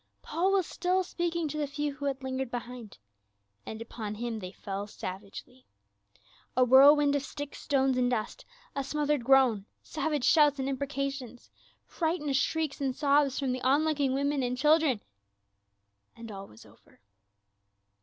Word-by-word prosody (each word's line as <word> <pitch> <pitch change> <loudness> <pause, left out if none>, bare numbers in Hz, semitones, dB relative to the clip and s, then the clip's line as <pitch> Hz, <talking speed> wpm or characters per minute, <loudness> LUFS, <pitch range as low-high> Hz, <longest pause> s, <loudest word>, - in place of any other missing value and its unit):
Paul 350 +5 0
was 385 -3 +2
still 365 +3 0
speaking 340 -2 -2
to 305 - -4
the 295 - -1
few 290 0 -3
who 285 0 -7
had 270 -1 -2
lingered 260 -1 -3
behind, 240 -2 -7 0.7
and 220 - -6
upon 215 -2 -6
him 230 0 -4
they 185 -2 -7
fell 200 +1 -6
savagely. 200 +6 -9 0.9
A 255 - +6
whirlwind 285 +3 +7
of 285 - +1
sticks, 290 +1 -7
stones, 270 -2 +1
and 245 0 +2
dust, 225 -4 -3 0.3
a 275 - -1
smothered 295 -1 -1
groan, 250 -6 +4 0.2
savage 300 -3 -2
shouts 295 -2 +5
and 265 0 -2
imprecations, 275 -3 -4 0.3
frightened 320 -4 -1
shrieks 310 +1 -1
and 265 -2 -1
sobs 280 -2 +2
from 270 -3 -1
the 255 0 -3
on 275 +4 +3
looking 285 -4 +1
women 280 0 0
and 250 0 -2
chil 305 +4 +5
dren, 265 -9 0 1.1
and 230 -1 -9
all 195 -1 -8
was 110 - -16
over. - - -22
275 Hz, 155 wpm, -29 LUFS, 245-295 Hz, 1.1 s, whirlwind